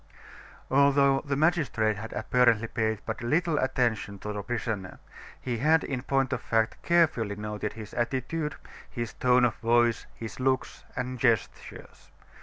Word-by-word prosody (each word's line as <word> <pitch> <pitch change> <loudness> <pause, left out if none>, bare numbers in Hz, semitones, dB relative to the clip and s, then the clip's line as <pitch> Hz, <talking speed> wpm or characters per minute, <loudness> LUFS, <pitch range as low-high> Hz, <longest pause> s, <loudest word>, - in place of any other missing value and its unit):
Although 140 0 +4
the 140 -1 -1
magistrate 145 -9 +1
had 110 +2 -7
apparently 120 -1 +2
paid 110 -1 -1
but 110 - -4
little 155 +6 +1
attention 120 -6 0
to 105 +2 -5
the 105 - -4
prisoner, 110 -4 -4 0.4
he 120 -3 -3
had 155 +4 +3
in 130 -3 -3
point 135 0 0
of - - -2
fact 110 -1 0
carefully 155 -12 +2
noted 105 0 -4
his 110 -2 -9
attitude, 135 +6 -2 0.3
his 120 -2 -5
tone 125 0 +3
of 115 - +1
voice, 120 0 +2
his 110 -1 -8
looks 130 0 -1
and 130 0 -4
gestures. 115 -4 -2
120 Hz, 145 wpm, -28 LUFS, 110-135 Hz, 0.4 s, Although